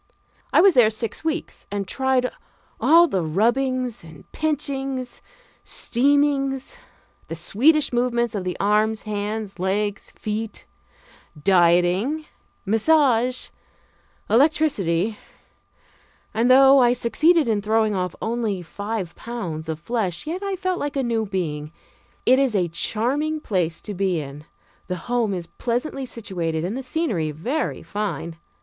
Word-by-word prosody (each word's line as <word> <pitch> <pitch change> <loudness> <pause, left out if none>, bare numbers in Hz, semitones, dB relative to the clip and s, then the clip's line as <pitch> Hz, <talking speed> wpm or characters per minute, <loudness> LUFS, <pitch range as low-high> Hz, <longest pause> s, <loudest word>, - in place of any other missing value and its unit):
I - - +6
was 390 0 +6
there 245 -6 +6
six 220 +4 -4
weeks 320 +1 -3
and 200 -1 -3
tried 260 +2 +1 0.5
all 340 +2 +6
the 190 - 0
rubbings, 240 +8 0 0.3
pinchings, 270 -4 -2 0.4
steamings; 275 - +1 0.5
the 165 - -5
Swedish 270 - +2
movements 240 -1 +1
of 200 -3 -3
the 180 -1 -3
arms, 215 +2 +2
hands, 210 -1 -4
legs, 200 +2 -1
feet; 215 +1 -4 0.7
dieting, 180 - +3 0.4
massage, 250 +2 +2 0.8
electricity, 220 - +2 1.1
and, 230 +3 +2
though 270 +1 +7
I 245 -1 +5
succeeded 305 +6 +3
in 215 -3 +1
throwing 215 0 +2
off 180 -2 -2
only 220 -5 -1
five 200 0 -5
pounds 175 -10 -5
of 160 -1 -3
flesh, 185 -3 -2
yet 340 +5 -4
I 395 -1 -2
felt 370 -1 -2
like 290 0 -3
a 270 - 0
new 225 -3 0
being. 155 -6 -3 0.5
It 255 +2 +5
is 265 -5 +1
a 180 -3 +1
charming 270 - -1
place 180 - -2
to 210 - -5
be 190 -3 0
in 145 +1 -8 0.4
the 180 - -2
home 225 +2 -1
is 175 -2 -4
pleasantly 245 - -3
situated 175 -8 -3
and 195 +6 -3
the 265 - -3
scenery 250 - -1
very 235 - -3
fine. 205 -5 -4
225 Hz, 130 wpm, -23 LUFS, 190-270 Hz, 1.1 s, though